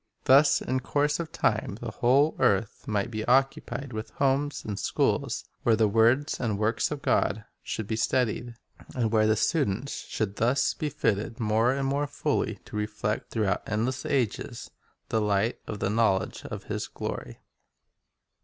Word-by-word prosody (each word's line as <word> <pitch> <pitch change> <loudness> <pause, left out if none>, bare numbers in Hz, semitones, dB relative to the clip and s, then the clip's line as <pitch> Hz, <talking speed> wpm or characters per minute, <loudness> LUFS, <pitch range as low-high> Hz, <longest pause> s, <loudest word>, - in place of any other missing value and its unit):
Thus 140 +2 +5
in 130 +1 0
course 145 +3 0
of 165 -2 -4
time 105 -2 0
the 120 -2 -5
whole 135 +7 +3
earth 100 +1 +1
might 105 +1 -1
be 110 -1 -3
occupied 135 +1 +1
with 110 0 -5
homes 140 +1 0
and 105 -2 -4
schools - - 0 0.2
where 115 - +4
the 110 -1 +3
words 115 +7 +3
and 115 -4 0
the 100 - -3
works 110 0 +1
of 150 -2 -5
God 110 +1 +1 0.2
should 110 - -4
be 110 - -2
studied, 120 +1 0 0.4
and 115 -4 0
where 110 -1 +4
the 110 - +4
students 135 - 0
should 105 -2 -3
thus 125 +5 +2
be 155 - -3
fitted 110 -4 -1
more 110 +3 +2
and 135 0 -1
more 140 +2 0
fully 145 - -1
to - - -10
reflect, 105 0 -2
through 110 -2 0
out 95 -2 0
endless 115 +5 -1
ages, 130 -7 -2 0.4
the 110 - +1
light 105 +2 +1
of 105 - -4
the 95 - -1
knowledge 110 -4 +1
of - - -6
His - - -4
glory. - - -6
115 Hz, 170 wpm, -27 LUFS, 105-135 Hz, 0.4 s, Thus